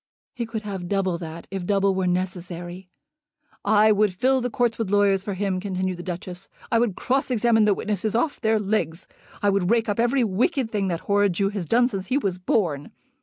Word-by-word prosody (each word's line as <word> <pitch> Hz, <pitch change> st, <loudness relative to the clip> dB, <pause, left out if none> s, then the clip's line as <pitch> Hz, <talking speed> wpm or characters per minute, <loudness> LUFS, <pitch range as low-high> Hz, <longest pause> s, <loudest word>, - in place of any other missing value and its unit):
"He 235 Hz, -2 st, -4 dB
could 220 Hz, -1 st, -5 dB
have 195 Hz, -4 st, -5 dB
double 190 Hz, -4 st, 0 dB
that, 165 Hz, 0 st, -7 dB
if 195 Hz, -2 st, -3 dB
double 195 Hz, +1 st, +2 dB
were 190 Hz, -1 st, 0 dB
necessary." 180 Hz, 0 st, -4 dB, 0.7 s
"I 215 Hz, +1 st, +5 dB
would 205 Hz, -2 st, +2 dB
fill 260 Hz, +6 st, +2 dB
the 245 Hz, -, -1 dB
court 235 Hz, -1 st, 0 dB
with 225 Hz, -4 st, -1 dB
lawyers 200 Hz, -1 st, +3 dB
for 200 Hz, -1 st, -4 dB
him," 190 Hz, -1 st, -1 dB
continued 185 Hz, -1 st, -2 dB
the -, -, -6 dB
Duchess. 180 Hz, +1 st, -6 dB, 0.2 s
"I 230 Hz, -, +4 dB
would 230 Hz, -6 st, +1 dB
cross 270 Hz, +2 st, 0 dB
examine 230 Hz, -2 st, +3 dB
the 205 Hz, -2 st, +3 dB
witnesses 210 Hz, +1 st, -2 dB
off 280 Hz, +6 st, 0 dB
their 220 Hz, -2 st, +3 dB
legs. 190 Hz, -5 st, -1 dB, 0.4 s
I 205 Hz, -, +4 dB
would 195 Hz, -2 st, +1 dB
rake 230 Hz, 0 st, +2 dB
up 205 Hz, +1 st, -1 dB
every 240 Hz, +2 st, +3 dB
wicked 235 Hz, -, 0 dB
thing 200 Hz, -3 st, 0 dB
that 170 Hz, -3 st, -2 dB
horrid 205 Hz, -1 st, +2 dB
Jew 195 Hz, +3 st, +1 dB
has 200 Hz, -4 st, -4 dB
done 245 Hz, +1 st, +4 dB
since 195 Hz, -6 st, -5 dB
he 260 Hz, -, +1 dB
was 195 Hz, -9 st, -1 dB
born. 170 Hz, -7 st, 0 dB
200 Hz, 210 wpm, -24 LUFS, 185-225 Hz, 0.7 s, I